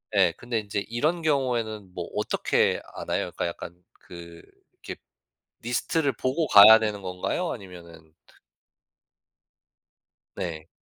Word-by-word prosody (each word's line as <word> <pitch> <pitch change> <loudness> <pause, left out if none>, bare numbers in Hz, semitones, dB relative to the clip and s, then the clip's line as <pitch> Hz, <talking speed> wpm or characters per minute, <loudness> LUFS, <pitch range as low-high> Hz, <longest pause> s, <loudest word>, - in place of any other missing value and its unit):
예. 90 -4 +4
근데 120 -2 -3
인제 100 -1 -4
이런 155 +9 -1
경우에는 120 - -1
뭐 85 -2 -5
어떻게 - - 0
아나요? - - -3
그러니까 - - -2
약간 85 0 -8 0.2
그 85 -1 -12 0.4
이렇게 - - -8 0.6
리스트를 135 +5 -1
보고 145 +5 -1
가야 105 +2 +9
되는 105 -2 -3
건가요? 95 - -3
아니면은 85 -6 -12
트 - - -24 2.0
네. 80 -2 -6
105 Hz, 260 characters per minute, -25 LUFS, 85-125 Hz, 2.0 s, 가야